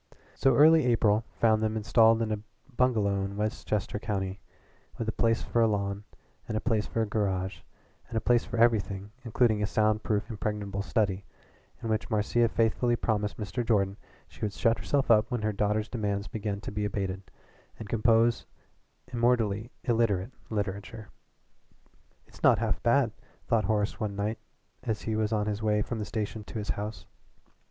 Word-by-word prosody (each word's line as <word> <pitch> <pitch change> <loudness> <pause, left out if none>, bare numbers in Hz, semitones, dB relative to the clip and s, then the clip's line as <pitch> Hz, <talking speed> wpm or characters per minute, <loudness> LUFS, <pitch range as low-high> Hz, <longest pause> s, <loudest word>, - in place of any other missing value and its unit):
So 135 - +3
early 155 -1 +6
April 110 -2 +3
found 110 -1 +3
them 110 0 0
installed 115 +1 +4
in 110 - -2
a 105 - -1 0.4
bungalow 105 -6 +2
in 100 +1 -5
Westchester 105 -1 -2
County, 100 -3 -3 0.6
with 115 - -3
a - - +1
place 115 0 +1
for 120 - +1
a 115 - +5
lawn, 100 -1 -2 0.4
a 110 - 0
place 110 -2 0
for 115 - -1
a - - 0
garage, 95 -3 -1 0.5
and 115 - -4
a - - +4
place 120 +1 +3
for - - -5
everything, 105 -4 +2
including 115 -2 +2
a 105 - +1
sound 110 0 +2
proof 105 -1 -1
impregnable 105 -3 -3
study, 100 -2 0 0.6
in 115 - -3
which 110 -1 -1
Marcia 115 +2 +2
faithfully 115 +2 +2
promised 105 -3 -1
Mr. 105 +3 -3
Jordan 100 -4 +1 0.3
she - - -18
would 105 -2 -1
shut 115 +2 +1
herself 140 -4 +1
up 105 -1 +5
when 120 -4 -2
her 110 0 0
daughter's 105 +2 0
demands 105 -3 -2
began 105 -1 -3
to - - -6
be 105 0 -2
abated, 95 -2 -2 0.6
and 110 - -8
compose 115 +1 +2 0.7
immortally 115 -3 +1
illiterate 115 -4 +1 0.2
literature. 105 +1 -4 1.2
"It's - - -18
not - - +6
half - - -1
bad," 120 0 +3 0.4
thought 110 -3 +2
Horace 105 0 0
one 105 -3 -2
night 105 +3 -2 0.4
as 110 -4 -3
he 110 - -1
was 110 0 0
on 105 -2 +1
his 105 0 -2
way 105 -1 +2
from 115 +1 -4
the 105 - -3
station 105 +1 -4
to - - -7
his 105 -1 -5
house. 105 +2 -4
110 Hz, 170 wpm, -29 LUFS, 105-115 Hz, 1.2 s, early